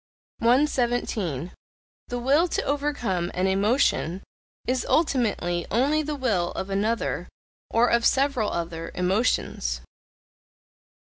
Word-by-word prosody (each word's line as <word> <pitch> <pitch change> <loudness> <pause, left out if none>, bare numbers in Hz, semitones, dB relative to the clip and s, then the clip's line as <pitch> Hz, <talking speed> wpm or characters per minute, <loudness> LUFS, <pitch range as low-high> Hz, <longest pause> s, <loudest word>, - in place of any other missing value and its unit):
117. 235 - +1 0.6
The 245 - -3
will 280 +8 +3
to - - -1
overcome 270 -12 -1
an 185 - +1
emotion, 195 - +1 0.4
is 255 0 0
ultimately 210 - +1
only 280 +7 +2
the 300 0 -3
will 210 -11 0
of 195 - -5
another, 215 +4 -1 0.4
or 235 +1 +3
of 235 -1 +2
several 270 -5 +1
other, 165 -1 -4
emotions. 180 - 0
230 Hz, 100 wpm, -25 LUFS, 180-265 Hz, 0.6 s, will